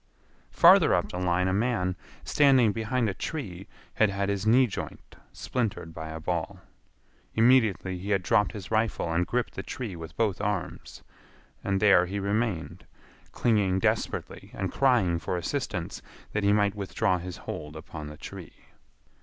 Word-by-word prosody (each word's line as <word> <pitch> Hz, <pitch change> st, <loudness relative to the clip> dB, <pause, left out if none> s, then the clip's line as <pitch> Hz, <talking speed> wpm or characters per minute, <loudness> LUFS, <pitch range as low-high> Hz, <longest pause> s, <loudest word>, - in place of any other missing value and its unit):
Farther -, -, +6 dB
up -, -, -1 dB
the 90 Hz, -, -4 dB
line 90 Hz, 0 st, +1 dB
a 95 Hz, -, +1 dB
man, 100 Hz, -4 st, 0 dB, 0.3 s
standing 130 Hz, -6 st, +4 dB
behind 115 Hz, +3 st, -1 dB
a 100 Hz, -, -1 dB
tree, 95 Hz, -, -6 dB, 0.3 s
had 110 Hz, -, +3 dB
had 100 Hz, 0 st, -1 dB
his 100 Hz, +1 st, -2 dB
knee 125 Hz, +4 st, +6 dB
joint 110 Hz, -, -7 dB, 0.2 s
splintered 110 Hz, -9 st, -3 dB
by 80 Hz, 0 st, -7 dB
a 80 Hz, 0 st, -6 dB
ball. 85 Hz, 0 st, -3 dB, 0.8 s
Immediately 110 Hz, -6 st, +3 dB
he 100 Hz, +3 st, -6 dB
had 100 Hz, -3 st, +1 dB
dropped 105 Hz, +3 st, +2 dB
his 100 Hz, -2 st, -8 dB
rifle 110 Hz, -6 st, 0 dB
and 90 Hz, +1 st, +1 dB
gripped 125 Hz, 0 st, -1 dB
the -, -, -5 dB
tree 115 Hz, -8 st, -6 dB
with 80 Hz, -2 st, -9 dB
both 105 Hz, -4 st, 0 dB
arms. 105 Hz, -3 st, -4 dB, 0.6 s
And 95 Hz, -1 st, 0 dB
there 95 Hz, -4 st, +5 dB
he 100 Hz, +3 st, -3 dB
remained, 100 Hz, -3 st, -2 dB, 0.4 s
clinging 105 Hz, -5 st, +2 dB
desperately 95 Hz, -, -2 dB
and 95 Hz, -1 st, -3 dB
crying 115 Hz, -11 st, +3 dB
for 90 Hz, -, -3 dB
assistance 90 Hz, -, -3 dB, 0.3 s
that 105 Hz, -, -1 dB
he 100 Hz, -, +4 dB
might 100 Hz, -1 st, +3 dB
withdraw 100 Hz, -1 st, 0 dB
his 90 Hz, +1 st, -7 dB
hold 75 Hz, +1 st, -7 dB
upon 80 Hz, -1 st, -8 dB
the 75 Hz, 0 st, -9 dB
tree. -, -, -11 dB
100 Hz, 160 wpm, -27 LUFS, 90-110 Hz, 0.8 s, Farther